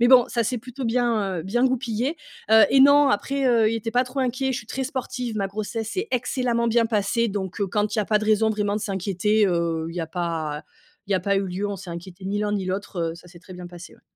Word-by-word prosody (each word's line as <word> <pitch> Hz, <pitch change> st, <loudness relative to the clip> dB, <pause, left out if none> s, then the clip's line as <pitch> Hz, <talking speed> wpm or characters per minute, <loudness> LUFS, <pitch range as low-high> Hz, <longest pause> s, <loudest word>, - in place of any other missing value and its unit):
mais 240 Hz, -, +5 dB
bon, 250 Hz, -2 st, +7 dB
ça 235 Hz, -1 st, 0 dB
s'est 245 Hz, +2 st, -1 dB
plutôt 250 Hz, +3 st, -7 dB
bien, 225 Hz, -6 st, 0 dB
heu, 160 Hz, -, -4 dB
bien 240 Hz, +7 st, +1 dB
goupillé, 255 Hz, +2 st, 0 dB, 0.3 s
heu, 220 Hz, 0 st, +8 dB
et 270 Hz, -, +5 dB
non, 285 Hz, +1 st, +7 dB
après, 270 Hz, +4 st, 0 dB
heu, 225 Hz, -2 st, +4 dB
il -, -, -1 dB
était 225 Hz, 0 st, -4 dB
pas 245 Hz, +2 st, +2 dB
trop 255 Hz, +2 st, -4 dB
inquiet. 260 Hz, +1 st, 0 dB
Je 250 Hz, -, -2 dB
suis 215 Hz, -, -11 dB
très 265 Hz, +4 st, -3 dB
sportive, 250 Hz, -3 st, -4 dB
ma 195 Hz, -, 0 dB
grossesse 215 Hz, +2 st, -4 dB
s'est 390 Hz, +5 st, -3 dB
excellemment 245 Hz, -1 st, 0 dB
bien 230 Hz, 0 st, +3 dB
passée, 225 Hz, +1 st, +1 dB
donc 195 Hz, -1 st, -4 dB
heu, 200 Hz, -, 0 dB
quand 210 Hz, +2 st, -1 dB
il 220 Hz, -, -1 dB
y -, -, +3 dB
a -, -, -5 dB
pas 210 Hz, +1 st, +2 dB
de 215 Hz, -, -4 dB
raison 220 Hz, 0 st, +3 dB
vraiment 210 Hz, -1 st, -1 dB
de 215 Hz, -, -3 dB
s'inquiéter, 200 Hz, +2 st, +1 dB
heu, 170 Hz, -2 st, +1 dB, 0.3 s
il 165 Hz, -, -8 dB
y 175 Hz, -, -2 dB
a 165 Hz, -, -3 dB
pas 160 Hz, -4 st, -3 dB, 0.4 s
il 200 Hz, -, -1 dB
y -, -, +3 dB
a 185 Hz, -, +1 dB
pas 200 Hz, +1 st, +1 dB
eu 195 Hz, 0 st, 0 dB
lieu. 185 Hz, +3 st, -3 dB
On 200 Hz, -, -4 dB
s'est 190 Hz, 0 st, -11 dB
inquiété 180 Hz, +2 st, -9 dB
ni 200 Hz, +2 st, -1 dB
l'un 210 Hz, -, 0 dB
ni 195 Hz, -2 st, -1 dB
l'autre, 190 Hz, 0 st, -4 dB
heu, -, -, -10 dB
ça 180 Hz, +1 st, -15 dB
s'est 175 Hz, 0 st, -14 dB
très 185 Hz, +2 st, -13 dB
bien 180 Hz, 0 st, -8 dB
passé, 175 Hz, 0 st, -11 dB
ouais. -, -, -25 dB
215 Hz, 280 wpm, -24 LUFS, 190-245 Hz, 0.4 s, heu